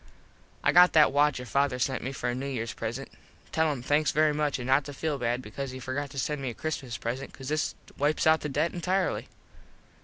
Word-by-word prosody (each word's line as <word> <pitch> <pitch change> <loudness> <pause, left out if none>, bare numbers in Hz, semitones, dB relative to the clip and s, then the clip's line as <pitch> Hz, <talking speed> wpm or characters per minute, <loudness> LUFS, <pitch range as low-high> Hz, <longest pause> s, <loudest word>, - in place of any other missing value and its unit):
I - - +4
got 180 +1 +7
that 150 -4 +6
watch 145 0 +3
your 125 - -6
father 140 +1 +1
sent 130 +2 -1
me 130 - -3
for 130 -2 -4
a 120 - 0
New 130 +3 -4
Years 115 -4 -3
present. 120 +4 -5 0.4
Tell 160 -1 +2
him 130 -4 -5
thanks 145 +3 +2
very 155 0 +3
much 150 -1 0
an 125 - -6
not 135 +3 +3
to 145 - -7
feel 150 -1 -2
bad 120 +1 -1
because 135 +5 -5
he 130 0 -7
forgot 140 +2 -3
to 135 - -10
send 145 +2 -1
me 135 - -2
a 115 - -7
Christmas 135 -7 -4
present 130 +4 -4
cause 135 0 -8
this 155 0 -1 0.2
wipes 150 +2 +1
out 160 0 +5
the 150 - -3
debt 150 +4 0
entirely. 180 +2 0
140 Hz, 235 wpm, -28 LUFS, 130-150 Hz, 0.4 s, got